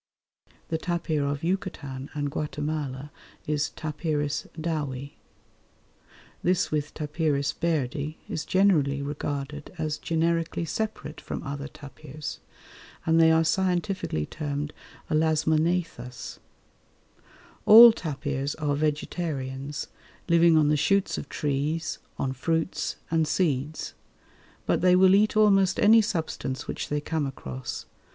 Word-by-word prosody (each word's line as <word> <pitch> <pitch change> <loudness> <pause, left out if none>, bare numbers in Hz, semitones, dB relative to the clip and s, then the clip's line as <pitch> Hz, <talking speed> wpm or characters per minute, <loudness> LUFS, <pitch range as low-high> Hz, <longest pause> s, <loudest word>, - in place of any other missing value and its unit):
The 160 - -1
tapir 165 -4 -1
of 145 +1 -3
Yucatan 150 -7 -3
and 145 -1 -2
Guatemala 150 -2 -3 0.3
is 150 0 0
T. - - -16 0.8
Dowi. 145 -4 -3 1.3
This 180 0 +1
with 150 -1 -1
T. 155 - -3
Bairdi 150 -1 -1
is 160 - -3
generally 150 -8 +2
regarded 145 0 -4
as 155 -2 -2
generically 165 0 0
separate 215 -4 -4
from - - -5
other 140 -1 -5
tapirs, 145 0 -8 0.7
and 165 0 +4
they 160 0 +6
are 160 0 +4
scientifically 180 - 0
termed 145 - -4 0.4
Elasmognathus. 155 -4 0 1.3
All 230 +2 +11
tapirs 140 -6 -3
are 150 -2 -1
vegetarians, 145 -2 -2 0.4
living 170 -1 +5
on 150 -1 +4
the 150 - +4
shoots 195 +6 +1
of - - -9
trees, 150 +2 -1 0.2
on 130 -1 -1
fruits 160 +6 -1 0.2
and 160 -1 +2
seeds; 150 -3 -1 0.7
but - - +1
they 180 0 +5
will 190 0 +6
eat 210 +2 +4
almost 195 -3 +4
any 220 +2 +7
substance 160 -9 -3
which - - -4
they 150 0 -1
come 155 -1 -1
across. 65 - -6
155 Hz, 115 wpm, -27 LUFS, 145-170 Hz, 1.3 s, All